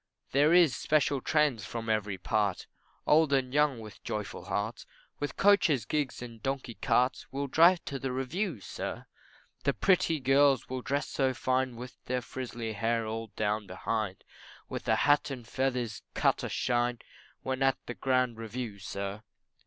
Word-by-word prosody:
There 145 +4 +4
is 170 -7 +6
special 145 -3 +1
trains 150 -8 +2
from 115 0 -5
every 105 -3 0
part, 100 -1 0 0.4
Old 155 -1 +4
and 130 -2 +1
young 145 -4 +3
with 110 -2 -11
joyful 105 -4 -4
hearts, 105 +4 -3 0.3
With 145 - -4
coaches, 195 - +4
gigs, 145 -5 -2
and 115 -2 -10
donkey 135 -2 -3
carts, 125 +3 +1
Will 140 +1 -2
drive 170 +6 +5
to 135 - -4
the 135 -1 -3
review, 135 - -2
sir. - - -5 0.6
The 140 - +2
pretty 165 - +3
girls 135 +1 +4
will 130 0 -4
dress 140 +3 -1
so 130 -2 0
fine, 130 0 0
With 125 +2 -10
their 125 0 -1
frizzly 120 -3 -5
hair 115 +2 0
all 110 +1 -4
down 105 -1 -1
behind, 95 +1 -3 0.4
With - - -6
a - - +4
hat 145 0 +3
and 125 -4 -7
feathers 125 -5 -1
cut - - +2
a - - -2
shine 120 -1 0 0.5
When 130 0 -2
at 135 0 +3
the 120 - -5
grand 130 -2 +1
review, 115 -2 -5
sir. 100 +1 -5
125 Hz, 160 wpm, -30 LUFS, 115-140 Hz, 0.6 s, is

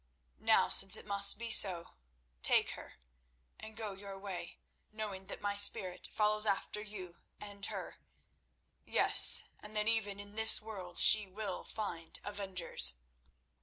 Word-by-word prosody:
Now, - - 0
since 195 0 +5
it - - -13
must 200 -1 +5
be 230 +1 -8
so, 180 -6 +4 0.5
take - - 0
her - - -13 0.7
and 220 0 -13
go 215 -3 -7
your 195 0 -12
way, 195 -3 -10 0.3
knowing 210 -3 -9
that - - -11
my 205 0 -5
spirit 190 -2 +2
follows 215 0 -1
after 205 +1 -4
you 190 -5 -11 0.2
and 205 -1 -13
her; - - -10 0.9
yes, - - +6 0.2
and 210 +1 -15
that 210 0 -2
even 210 -3 -4
in 205 0 -12
this 220 +1 +2
world 200 -5 -12
she 215 -2 +5
will 195 0 -8
find 170 -7 -9
avengers." 190 - -1
205 Hz, 140 wpm, -31 LUFS, 190-215 Hz, 0.9 s, yes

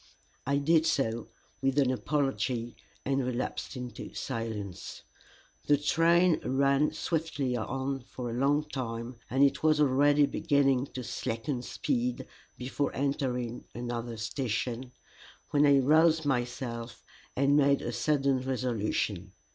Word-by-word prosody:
I 140 0 +2
did 160 +3 +3
so, 115 -7 0 0.3
with 135 +1 +1
an 135 -3 +4
apology, 130 -3 -1 0.3
and 135 0 +1
relapsed 125 +2 -3
into 125 -1 -7
silence. 110 -7 -5 0.6
The 145 - +5
train 165 +3 +3
ran 140 +3 +2
swiftly 155 -6 -1
on 135 +4 -2
for 120 -1 -6
a - - -4
long 140 +4 +2
time, 120 -3 -5
and 135 +2 +3
it 140 - +3
was 155 -1 +3
already 145 +1 +4
beginning 140 -3 +2
to 130 - -4
slacken 115 +3 -3
speed 120 0 -2 0.3
before 130 +3 -2
entering 130 -4 -2
another 120 -1 -4
station, 120 +1 -3 0.6
when 145 0 +4
I 140 -1 +6
roused 160 +3 +4
myself 120 -2 -3 0.3
and 140 +2 +3
made 140 -1 +4
a - - -2
sudden 140 -3 +1
resolution. 110 -7 -2
135 Hz, 125 wpm, -29 LUFS, 120-145 Hz, 0.6 s, I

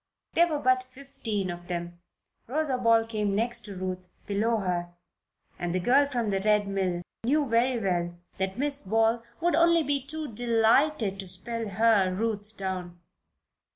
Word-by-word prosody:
There 340 +1 +5
were 310 -3 -1
but 255 -2 +2
fifteen 235 -8 -4
of 175 0 -9
them. 175 -1 -5 0.5
Rosa 285 +1 0
Ball 230 -2 +4
came 210 -3 -1
next 235 +3 0
to 200 -2 -8
Ruth, 185 0 -5 0.2
below 220 +3 +1
her, 180 -3 -2 0.7
and 175 0 -2
the - - +2
girl 265 +10 +4
from 240 -6 -1
the 195 - +1
Red 210 -1 +3
Mill 185 -3 -1 0.2
knew 290 +5 +2
very 240 +1 +2
well 175 -4 -1 0.2
that 190 0 -1
Miss 285 +1 0
Ball 225 +3 +2 0.2
would 345 +1 +2
only 335 -1 +4
be 285 -1 0
too 300 -2 -4
delighted 230 -1 +2
to 195 - -5
spell 225 +5 -3
her, 200 -2 +3
Ruth, 210 +1 -3
down. 185 -2 -4
220 Hz, 160 wpm, -27 LUFS, 190-255 Hz, 0.7 s, There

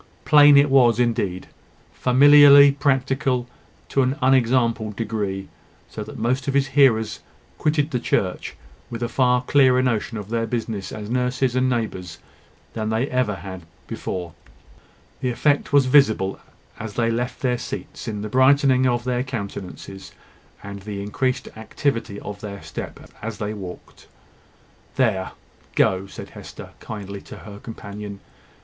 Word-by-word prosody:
Plain 145 -1 +7
it 140 0 +4
was 120 -4 +5
indeed, 105 -6 -1 0.5
familiarly 140 +2 +7
practical 135 -2 0 0.4
to 135 - +2
an 130 +2 0
unexampled 120 -4 +2
degree; 100 -4 -3 0.4
so - - -5
that - - -10
most 125 +5 -1
of 135 - -1
his 135 -1 +2
hearers 130 -6 +3 0.4
quitted 150 0 +1
the 125 - 0
church 95 -5 -2 0.3
with 120 0 -5
a - - 0
far 125 +1 +2
clearer 130 -1 +4
notion 115 -2 -1
of 105 -1 -7
their 115 -1 -1
business 110 -4 -4
as 105 -1 -7
nurses 125 +1 0
and 130 0 +2
neighbours 95 -8 -3 0.6
than 110 -1 -3
they 110 +1 0
had 135 - -1
ever 105 -7 -2 0.2
before 90 -2 -5
had. - - -25 0.7
The 130 - 0
effect 145 +4 +1
was 140 -2 +5
visible 110 -8 +3 0.4
as 110 -2 -7
they 115 -1 +1
left 125 +2 -3
their 125 -2 0
seats, - - -7
in 105 -2 -4
the - - -3
brightening 130 +2 +4
of 120 -1 0
their 125 0 -1
countenances, 100 -5 -7 0.5
and 100 0 -7
the 100 0 -6
increased 130 +4 -2
activity 115 -2 -3
of 105 -1 -8
their 100 -2 -8
step - - -7 0.2
as 110 -1 -5
they 105 0 -3
walked. 95 -4 -10 0.9
"There, 95 -1 0 0.4
go," 95 +1 +2
said - - -10
Hester, - - -11
kindly, 100 -2 -7
to - - -11
her 105 -1 -11
companion. 105 -3 -8
120 Hz, 145 wpm, -22 LUFS, 105-130 Hz, 0.9 s, Plain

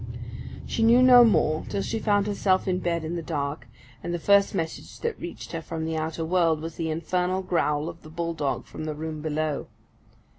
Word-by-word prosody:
She - - -2
knew 235 +3 +6
no 250 -1 +9
more 155 -8 +3
till 195 - -1
she 225 - -2
found 205 -2 +2
herself 200 -2 +1
in 185 -1 +1
bed 170 -2 -1
in 165 +2 -3
the 170 - -3
dark; 145 -2 -3 0.3
and 175 - -4
the 175 - -1
first 200 +3 +4
message 165 -3 -4
that 465 -1 -2
reached 175 - -7
her 165 - -4
from 160 0 -4
the 160 0 -2
outer 160 +1 -2
world 165 -2 +2
was 165 +1 -6
the 165 -1 -2
infernal 180 +4 -1
growl 150 -4 0
of 170 0 -8
the 155 - -12
bull 170 +1 -3
dog 140 -5 -2
from 155 - -7
the 155 -1 -3
room 155 0 -5
below. 155 -1 -2
165 Hz, 210 wpm, -26 LUFS, 155-185 Hz, 0.3 s, no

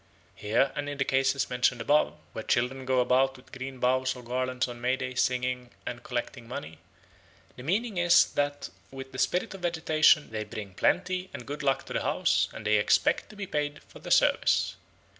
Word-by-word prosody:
Here 115 +6 +1
and 145 -1 -3
in 145 - -5
the 135 - 0
cases 135 +1 +1
mentioned 125 0 +1
above, 145 +6 +2 0.2
where - - -4
children 130 +2 0
go 130 -1 +3
about 130 +2 +2
with 130 - -19
green 130 +1 -7
boughs 130 +1 +1
or 125 - -10
garlands 130 +1 -1
on 120 -1 -8
May 125 +1 +2
Day 130 -1 -5
singing 125 0 0 0.2
and 120 0 -5
collecting 120 -1 -5
money, 80 -9 -7 0.8
the - - -10
meaning 195 - -1
is 175 0 +6
that 145 0 -2 0.2
with 135 0 -9
the 130 - -7
spirit 180 - 0
of 195 - -10
vegetation 160 -4 +3
they 110 -1 -3
bring 105 -2 -8
plenty 185 - 0
and 120 - -8
good 145 +1 -5
luck 135 -2 +1
to - - -7
the - - 0
house, - - +1
and 110 - -9
they 105 0 +4
expect 105 - +2
to 210 - -13
be 200 -1 -5
paid 145 -4 -3
for - - -15
the - - -9
service. - - +3
130 Hz, 195 wpm, -28 LUFS, 125-145 Hz, 0.8 s, is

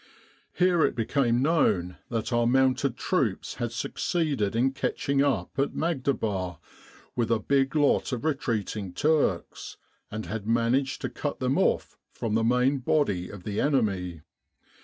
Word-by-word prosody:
Here 180 -3 +3
it - - +1
became 120 +1 +1
known 95 - +2
that 115 0 -2
our 120 0 +3
mounted 130 0 +2
troops - - -1
had - - -1
succeeded 140 - -1
in 130 +3 +2
catching 135 +1 -1
up 130 -11 +1
at 140 - 0
Maghdaba 110 - -1 0.6
with 120 -2 0
a 115 - +3
big 135 +5 +1
lot 145 -2 +2
of 125 +2 -3
retreating 110 - -2
Turks, 145 - 0 0.3
and 110 -1 -5
had 105 +3 -5
managed 120 +4 +1
to - - -2
cut 145 - -4
them 130 +1 +1
off - - 0
from 110 -2 -4
the 115 +1 +2
main 125 +4 +2
body 115 - 0
of 100 -3 -10
the 105 +1 -2
enemy. 95 - 0
125 Hz, 145 wpm, -27 LUFS, 105-140 Hz, 0.6 s, Here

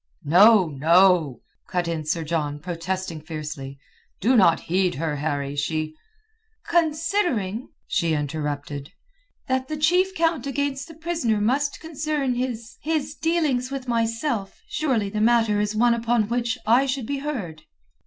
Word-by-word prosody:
"No, 195 +6 +6
no," 165 0 +3 0.3
cut 180 -2 -1
in 165 -2 -3
Sir 160 +2 -1
John, 150 -2 -2
protesting 175 0 -4
fiercely. 150 -4 -6 0.4
"Do 250 +6 +3
not 175 -7 +5
heed 180 +1 0
her, 150 0 -2
Harry. 140 -1 -2
She...." 155 +2 -2 0.7
"Considering," 315 - 0 0.2
she 165 -1 0
interrupted, 145 -1 -3 0.6
"that 260 0 0
the 310 - -4
chief 360 +5 +2
count 325 -5 +1
against 275 -1 -2
the 325 - -12
prisoner 320 -10 -1
must 270 +7 0
concern 305 -4 -2
his... 240 -2 -4
his 310 -2 -1
dealings 310 -7 0
with 270 -1 -5
myself, 230 -2 -1
surely 235 -10 0
the 210 - -2
matter 225 -2 +3
is 210 +1 -1
one 235 +2 +4
upon 230 -2 +1
which 235 -1 -1
I 245 +5 +4
should 260 -2 -2
be 280 +3 -2
heard." 215 - -5
225 Hz, 140 wpm, -24 LUFS, 165-275 Hz, 0.7 s, No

